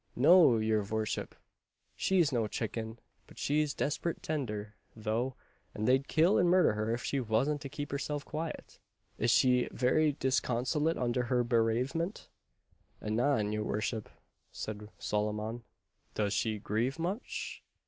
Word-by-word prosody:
"No, 155 -2 +7
your 110 -1 +2
vorship, 110 +1 -3 0.6
she's 175 -6 +2
no 115 -4 +1
chicken, 110 +1 -4 0.3
but - - -17
she's 150 0 0
desperate 155 +3 -2
tender, 105 -9 -3 0.2
though; 115 +4 -1 0.4
and 105 - -1
they'd 130 +2 +3
kill 165 +5 +4
and 180 - +4
murder 180 -9 +5
her, 110 +1 -1
if 120 +1 -2
she 140 - -1
vasn't 130 +5 +1
to 140 - -6
keep 145 +1 -5
herself 145 +1 -3
quiet." 160 +1 -6 0.4
"Is 115 - +2
she 125 0 +4
very 145 +4 +2
disconsolate 130 +3 0
under 125 0 0
her 125 0 +2
bereavement?" 120 - 0 0.7
"Anan, 110 0 +1
your 105 0 -1
vorship," 110 +1 -2 0.4
said 105 -1 -6
Solomon. 105 +2 -2 0.5
"Does 105 -1 0
she 110 +1 0
grieve 115 +7 -1
much?" 180 +8 -4
125 Hz, 135 wpm, -32 LUFS, 110-145 Hz, 0.7 s, No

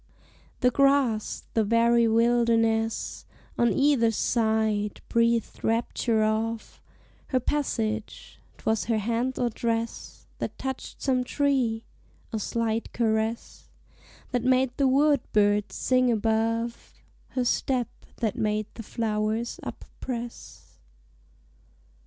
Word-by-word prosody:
The 250 - +4
grass, 275 -5 +2
the 225 - +3
very 230 +2 +4
wilderness 225 -1 +1 0.3
On 235 -1 +3
either 270 -5 +3
side, 220 -2 0
breathed 230 -1 +1
rapture 225 0 +1
of 220 +1 -2 0.5
Her 260 - +1
passage: 225 -6 -3 0.2
'twas 220 0 0
her 225 -1 +1
hand 235 +4 -1
or 240 -1 0
dress 230 +1 -3
That - - -4
touched 265 -1 -6
some 255 -2 +2
tree 250 -5 0 0.5
a 220 - -1
slight 225 +1 -2
caress 220 0 -1 0.6
That 245 -2 0
made 255 0 +2
the 275 - +3
wood 285 +2 +4
birds 205 0 +2
sing 255 -1 +2
above; 230 +1 -1 0.4
Her 250 - +2
step 250 0 +1 0.3
that 220 -4 -1
made 215 0 0
the 230 - -8
flowers 220 +1 -2
up - - -7
press. 240 -2 -7
230 Hz, 110 wpm, -26 LUFS, 220-250 Hz, 0.6 s, The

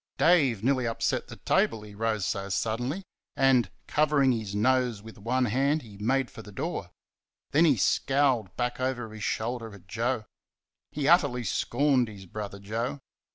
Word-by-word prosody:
Dave 140 - +4
nearly 130 -1 +2
upset 115 - -1
the - - -9
table, 110 -2 +1
he 105 -1 -11
rose 110 -1 -1
so 100 -2 -2
suddenly; 120 - -1 0.3
and 130 -6 +4 0.2
covering 145 -2 +3
his 110 -4 -3
nose 125 0 +2
with 110 -1 -12
one 125 +5 +1
hand 135 +6 +1
he 105 -4 -13
made 130 +4 +1
for - - -9
the 105 - -12
door; 95 - -4 0.6
then 160 +4 +5
he 145 -6 +4
scowled 130 -2 +1
back 120 0 -1
over 125 -4 -2
his 110 -1 -7
shoulder 115 0 -2
at 95 - -16
Joe. 115 +4 -1 0.7
He 145 -2 -2
utterly 145 -8 +4
scorned 125 +4 +1
his 100 -3 -10
brother 100 +1 -6
Joe. 115 +7 -3
120 Hz, 160 wpm, -28 LUFS, 110-135 Hz, 0.7 s, then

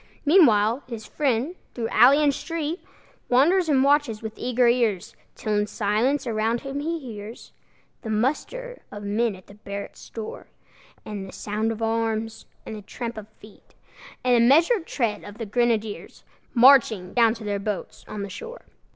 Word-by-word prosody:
Meanwhile, 245 - +5
his 225 -3 -7
friend, 270 +3 -1 0.2
through 230 -2 -2
alley 270 +6 +6
and 285 -1 +3
street, 330 +3 -4 0.5
Wanders 320 +8 +4
and 270 -3 +4
watches 280 -6 +2
with 220 -1 -5
eager 245 0 +1
ears, 235 -6 +1 0.2
Till 215 - -3
in 205 - +3
the 210 - -2
silence 225 +7 0
around 225 0 0
him 275 +1 -5
he 330 +3 -2
hears 225 -5 -9 0.5
The 225 - -7
muster 305 - -2
of 205 0 -8
men 210 +1 0
at 185 - -16
the - - -15
barrack 200 -1 -7 0.2
door, 220 -2 -7 0.6
The 200 -2 -6
sound 215 +2 -2
of 225 0 -5
arms, 225 0 -2 0.2
and 220 - -6
the 210 - -8
tramp 235 +3 -6
of 215 -1 -8
feet, 210 0 -18 0.5
And 250 - +3
the 235 0 +5
measured 330 - +4
tread 230 -6 -1
of 205 +1 -10
the 225 - -4
grenadiers, 220 -1 -1 0.3
Marching 235 -7 +5
down 230 -2 +4
to 225 - -10
their 205 -1 -2
boats 200 -1 -5
on 205 -1 -5
the 200 - -6
shore. 475 +2 -9
230 Hz, 170 wpm, -24 LUFS, 210-275 Hz, 0.6 s, alley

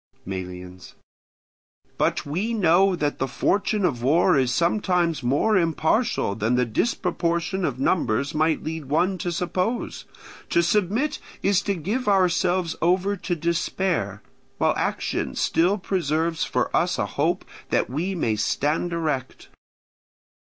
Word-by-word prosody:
Melians. 90 -1 -7 1.0
But - - +1
we 190 +11 -2
know 190 0 +4
that 145 -3 -2
the 135 - 0
fortune 205 - 0
of 125 -8 -1
war 145 +8 +4
is 130 -3 +2
sometimes 175 0 +1
more 140 - +2
impartial 165 - +1
than 110 +4 0
the 125 0 +2
disproportion 170 - -1
of 130 -6 -1
numbers 140 -2 +1
might 155 +1 +1
lead 160 -1 -4
one 175 +7 +1
to 175 - -2
suppose; 180 +7 -2 0.4
to 170 - +3
submit 210 - +1 0.2
is 200 -1 +3
to 200 -1 -1
give 210 - -3
ourselves 185 -2 +2
over 185 +4 +2
to 175 0 -2
despair, 170 - -1 0.3
while - - +2
action - - -2
still 180 +5 +2
preserves 165 -4 -1
for - - -1
us - - +1
a - - 0
hope - - -1 0.2
that - - +1
we 170 +9 -2
may 115 -10 0
stand 150 +10 0
erect. 150 -6 -3
170 Hz, 130 wpm, -24 LUFS, 140-190 Hz, 1.0 s, know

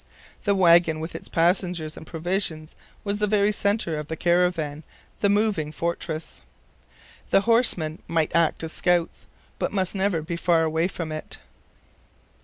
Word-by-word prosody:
The 200 -1 +3
wagon, 170 -3 +5
with 160 +1 -5
its - - -7
passengers 170 -2 0
and 160 - -11
provisions, 165 -2 -3 0.3
was 205 0 -2
the 210 - +2
very 205 0 +3
center 200 -6 0
of 150 - -6
the 160 - -4
caravan, 170 -4 +1 0.4
the 200 - +2
moving 200 -7 +1
fortress. 165 -1 -4 0.9
The - - +4
horsemen 200 -9 +1
might 160 -2 0
act 170 -1 +2
as 160 - -4
scouts, 175 -1 0 0.3
but - - -1
must 190 -3 -1
never 190 -5 0
be 170 +1 -4
far 170 -1 +3
away 160 +2 +1
from 165 -4 -5
it. 155 0 -7
170 Hz, 150 wpm, -25 LUFS, 160-195 Hz, 0.9 s, wagon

